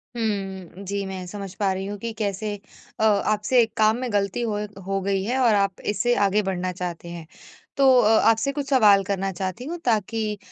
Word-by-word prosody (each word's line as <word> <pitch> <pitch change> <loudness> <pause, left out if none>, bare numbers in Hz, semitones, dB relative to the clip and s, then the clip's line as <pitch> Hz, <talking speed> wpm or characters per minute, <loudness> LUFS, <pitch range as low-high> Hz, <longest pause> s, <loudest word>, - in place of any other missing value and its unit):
हम्म। 195 -4 -4
जी, 200 0 -3
मैं 190 -1 -6
समझ 195 -1 -7
पा 195 -2 0
रही 190 +1 -4
हूँ 205 +1 -5
कि 230 +1 -4
कैसे 205 0 -2 0.4
अ - - +1 0.3
आपसे 215 +4 +3
एक 225 -1 -1
काम 215 +1 +4
में 250 -1 -4
गलती 200 +3 0
होए 210 -2 -2 0.2
हो 195 0 -1
गई 195 0 0
है 245 +5 -1
और 235 -4 +4
आप 200 -1 0
इससे 240 +4 +1
आगे 205 +2 +2
बढ़ना 185 -1 -2
चाहते 175 -1 -6
हैं। 170 -2 -8 0.5
तो 275 -1 +5
अ 215 - +3 0.2
आपसे 225 +5 +2
कुछ 280 0 -4
सवाल 210 -7 +5
करना 195 -1 -1
चाहती 190 +6 -5
हूँ 335 +4 -4
ताकि 215 -1 0
205 Hz, 200 wpm, -24 LUFS, 190-225 Hz, 0.5 s, तो